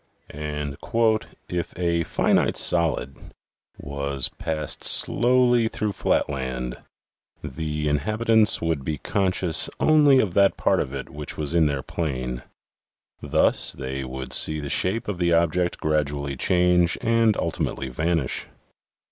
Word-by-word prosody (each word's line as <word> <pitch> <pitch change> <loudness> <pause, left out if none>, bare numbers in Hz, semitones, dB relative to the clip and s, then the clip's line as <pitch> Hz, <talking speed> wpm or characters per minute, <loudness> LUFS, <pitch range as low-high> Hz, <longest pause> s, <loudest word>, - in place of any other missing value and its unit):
" - - -39 1.2
If 90 -1 -4
a 85 -1 0
finite - - +1
solid 80 -5 +1 0.4
was 70 -1 -2
passed 80 -2 -5
slowly 120 -1 +3
through 105 -1 -3
flatland, 65 -8 -2 0.7
the 75 -1 -3
inhabitants 110 +8 +2
would 80 -4 -1
be 75 +2 -3
conscious 95 -1 +1
only 150 -4 +5
of 100 -8 0
that 100 +1 +3
part - - +2
of 65 - -3
it 70 -1 -7
which 75 0 -7
was 75 0 -3
in 85 -3 +4
their 70 -2 -2
plane. 65 -7 -4 0.8
Thus - - +1
they 65 0 -5
would 65 0 -6
see 75 0 +4
the 70 -1 -5
shape 100 +5 0
of 100 -4 -4
the 85 -1 +2
object 85 +1 +1
gradually 75 -2 -1
change 90 +3 +2
and 115 -2 +2
ultimately 65 - -3
vanish. 75 +1 -2
80 Hz, 125 wpm, -24 LUFS, 70-95 Hz, 1.2 s, only